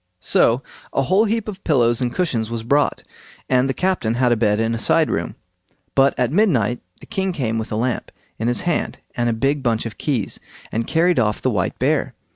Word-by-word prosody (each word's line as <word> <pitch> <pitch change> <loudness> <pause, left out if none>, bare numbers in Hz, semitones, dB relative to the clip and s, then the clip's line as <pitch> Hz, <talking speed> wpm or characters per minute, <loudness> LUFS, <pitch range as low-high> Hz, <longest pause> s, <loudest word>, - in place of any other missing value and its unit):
So 115 +7 +3 0.3
a - - +2
whole 190 +9 +3
heap 225 0 -1
of 200 -2 -7
pillows 120 -6 +2
and 125 -1 0
cushions 120 -12 -1
was 115 -1 -4
brought, 140 +5 +1 0.4
and 130 +1 +2
the - - +1
captain 180 -12 0
had 125 0 +2
a - - +5
bed 105 -2 +1
in 115 +1 +1
a 115 - -2
side - - +2
room. - - -2 0.6
But 135 0 +4
at 125 -1 +1
midnight 135 - +2 0.2
the - - -11
king 190 -1 -2
came 115 -9 -1
with 110 - -5
a - - -1
lamp 120 +2 -2 0.3
in 115 - -1
his 120 - +1
hand 175 -2 -1 0.2
and 120 0 +1
a - - +2
big 135 +5 0
bunch 115 -3 0
of 115 - -7
keys, 130 -9 -1 0.3
and 115 +1 -2
carried 170 -1 +3
off 105 -3 +1
the - - 0
white - - -1
bear. - - 0
125 Hz, 215 wpm, -21 LUFS, 115-160 Hz, 0.6 s, a